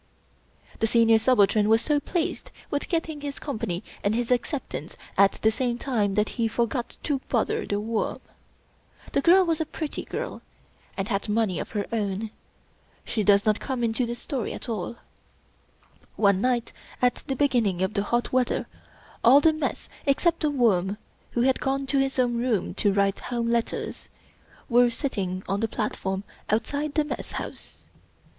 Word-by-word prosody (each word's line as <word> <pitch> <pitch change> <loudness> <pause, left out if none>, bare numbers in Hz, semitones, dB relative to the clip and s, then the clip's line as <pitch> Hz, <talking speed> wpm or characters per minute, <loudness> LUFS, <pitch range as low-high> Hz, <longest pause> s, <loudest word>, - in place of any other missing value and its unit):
The 225 - +2
Senior 225 -1 +5
Subaltern 215 -3 +4
was 225 +1 +4
so 295 -1 +2
pleased 335 +2 -2 0.2
with 285 - -2
getting 325 -3 -1
his 285 -1 -5
Company 220 - -3 0.2
and 205 +2 +2
his 240 +1 -1
acceptance 245 - -2 0.2
at 195 0 +5
the 220 - +2
same 240 +1 -1
time 215 -7 0
that 210 0 +2
he 225 - +3
for 230 +1 +1
got 240 +1 -4
to 280 -3 0
bother 235 -4 0
The 205 - 0
Worm. 220 +1 -2 0.9
The - - +2
girl 365 +5 +6
was 325 -2 0
a - - 0
pretty 310 -1 -4
girl, - - -5 0.6
and 195 0 -1
had 200 0 -1
money 210 -4 +1
of - - -5
her 205 -2 -1
own. 210 -1 -2 0.7
She 220 - -1
does 200 0 +5
not 215 -1 +3
come 260 -3 -3
into 235 +2 +1
this 240 0 -4
story 245 -2 -3
at - - -8
all. 220 -1 -3 1.2
One 200 -2 +3
night, 245 -1 0 0.3
at 250 0 +1
beginning 230 -10 +2
of 190 - -1
the 200 - +1
hot 240 +5 -1
weather, 255 -1 +1 0.6
all 260 +5 +8
the 315 +2 +4
Mess, 310 - -3 0.2
except 330 +4 +3
The 305 - +1
Worm 210 -8 +2 0.4
who 240 - +1
had 260 +1 +3
gone 275 +1 -1
to 275 +1 +1
his 270 0 0
own 245 -2 +2
room 235 -7 0
to 205 +1 +2
write 195 0 +1
Home 235 -1 -2
letters, 235 -1 -2 0.6
were 245 0 +5
sitting 195 -8 -3
on 195 +1 0
the 225 - +1
platform 195 -3 -2 0.3
outside 285 +7 -1
the 305 - +3
Mess 295 - -5
House. - - -7
235 Hz, 170 wpm, -26 LUFS, 205-270 Hz, 1.2 s, all